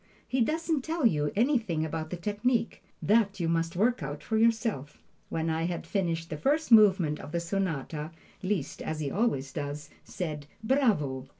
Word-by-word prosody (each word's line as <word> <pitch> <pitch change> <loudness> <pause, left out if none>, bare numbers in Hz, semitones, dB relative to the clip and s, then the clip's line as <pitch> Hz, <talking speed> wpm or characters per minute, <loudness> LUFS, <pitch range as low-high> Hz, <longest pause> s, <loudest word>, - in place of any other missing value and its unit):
He 260 0 0
doesn't 315 +3 +1
tell 320 -2 -1
you 150 -8 +2
anything 220 - +1
about 155 0 -4
the 180 - -4
technique; 215 +6 -1 0.2
that 205 -2 +3
you 170 - 0
must 165 0 0
work 230 +5 +2
out 145 +1 -5
for 220 - -2
yourself. 220 - +1 0.3
When 160 0 -2
I 160 0 0
had 175 -1 -4
finished 165 -4 -2
the 155 - -3
first 295 - +1
movement 190 -8 +6
of - - -9
the 170 - 0
sonata, 165 -4 -2 0.3
Liszt, 185 -7 -2
as 155 - -3
he 145 -3 -2
always 140 - 0
does, 145 +1 -5
said 150 -5 -5 0.2
"Bravo!" 195 - +1
175 Hz, 170 wpm, -29 LUFS, 155-225 Hz, 0.3 s, movement